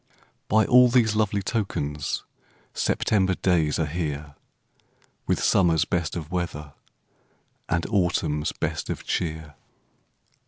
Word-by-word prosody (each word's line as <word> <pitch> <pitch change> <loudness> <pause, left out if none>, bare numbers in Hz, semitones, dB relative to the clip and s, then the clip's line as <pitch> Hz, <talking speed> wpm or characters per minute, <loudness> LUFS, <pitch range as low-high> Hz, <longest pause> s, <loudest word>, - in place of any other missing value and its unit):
By 110 +1 +3
all 125 0 +7
these 115 -3 +3
lovely 105 -2 0
tokens 75 - -2 0.5
September 95 -3 +1
days 80 -6 +1
are 80 - +1
here, 75 -2 -4 0.9
With - - 0
summer's 85 -4 +3
best 85 -2 -2
of 80 -2 -6
weather, 80 -5 -4 1.0
And 85 0 0
autumn's 85 -7 0
best - - -4
of - - -4
cheer. 80 -3 -3
85 Hz, 110 wpm, -25 LUFS, 75-100 Hz, 1.0 s, all